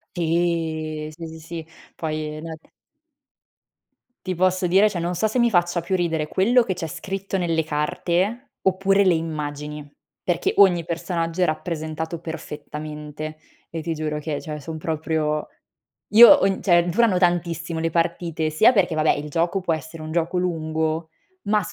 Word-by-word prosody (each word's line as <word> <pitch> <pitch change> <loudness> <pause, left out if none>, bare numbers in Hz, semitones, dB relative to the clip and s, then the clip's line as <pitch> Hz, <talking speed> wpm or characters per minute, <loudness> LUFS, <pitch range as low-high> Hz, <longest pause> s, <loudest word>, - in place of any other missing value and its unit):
Sì. 160 -2 -1
sì, 170 - -7
sì, 160 0 -10
sì. 165 0 -8 0.3
Poi 155 -1 -4
nell 160 0 -7 1.7
Ti 185 -1 -2
posso 185 +1 +2
dire 195 +4 +5
cioè, 185 - -4
non 175 +1 -2
so 220 +6 +1
se 220 - -2
mi 240 -1 +4
faccia 175 -3 +2
più 185 +3 -1
ridere 160 -3 -1
quello 235 +6 +4
che 195 - -2
c'è 170 -2 -4
scritto 195 +4 -5
nelle 165 -3 0
carte 175 - -1
oppure 195 +1 +3
le 185 -3 +4
immagini, 150 -2 -4 0.4
perché 175 -2 0
ogni 180 -4 +5
personaggio 170 0 -2
è - - +5
rappresentato 160 0 -3
perfettamente 150 -1 -7 0.3
e 165 - -5
ti 165 +1 -2
giuro 155 -1 -3
che 150 -1 -3
cioè, 150 -2 -6
son 160 +2 -6
proprio 155 -1 -1 0.7
io 235 +2 +11
ho 285 -8 +6
n 195 - -1
cioè 175 -3 +4
durano 205 +1 +3
tantissimo 175 -2 0
le 165 - +1
partite 165 -1 -1
sia 185 +10 +5
perché 185 -6 +2
vabbè 155 0 +3
il 150 +1 -5
gioco 170 +5 0
può 175 -2 0
essere 160 +1 -7
un 155 +1 -6
gioco 170 +1 0
lungo, 160 -2 -1 0.3
ma 210 +1 +2
165 Hz, 160 wpm, -23 LUFS, 155-180 Hz, 1.7 s, io